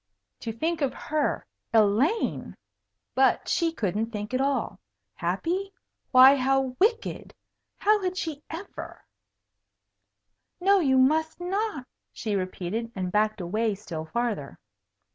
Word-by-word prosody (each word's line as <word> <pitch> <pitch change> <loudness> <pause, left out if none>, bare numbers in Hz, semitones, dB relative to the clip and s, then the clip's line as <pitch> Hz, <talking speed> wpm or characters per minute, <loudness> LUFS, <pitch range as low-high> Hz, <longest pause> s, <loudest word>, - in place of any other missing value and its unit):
To 230 - -4
think 320 +8 -2
of 275 -2 0
her 305 -1 -1 0.3
Elaine! 225 - +2 0.6
but 265 0 +3
she 335 -2 +1
couldn't 215 - -1
think 210 +1 -5
at 255 - +1
all. 275 0 -1 0.3
Happy? 380 +4 -2 0.4
Why, 260 +1 +8
how 265 -1 +1
wicked! 455 +4 0 0.4
How 425 0 +3
had 370 -1 -2
she 310 -5 -4
ever 340 +5 -8 1.5
"No, 390 +2 +4
you 265 -6 +3
must 315 +6 +2
not," 360 - -2 0.3
she 215 -3 -4
repeated, 190 +4 -3
and 185 -2 -3
backed 215 +1 +1
away 210 +4 0
still 170 -6 -6
farther. 220 - -3
260 Hz, 120 wpm, -27 LUFS, 215-330 Hz, 1.5 s, Why